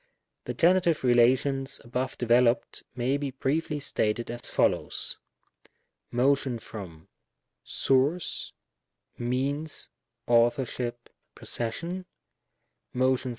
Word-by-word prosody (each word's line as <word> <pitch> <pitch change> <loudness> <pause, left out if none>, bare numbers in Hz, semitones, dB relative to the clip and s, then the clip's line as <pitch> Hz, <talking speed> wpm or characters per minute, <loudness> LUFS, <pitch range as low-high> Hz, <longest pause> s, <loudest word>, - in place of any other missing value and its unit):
The - - -4
Genitive 170 -3 +3
relations 130 +3 +3
above 125 +2 -3
developed 120 0 +2
may 130 +3 +1
be 145 -1 -3
briefly 150 +4 -1
stated 115 -4 -1
as 120 0 -2
follows: - - 0 0.9
Motion 130 0 +2
from 90 -8 -9 2.1
{Means, 140 +5 -1 0.4
Authorship, 120 0 +1 0.3
Possession. 170 +11 -3
125 Hz, 70 wpm, -28 LUFS, 120-140 Hz, 2.1 s, Genitive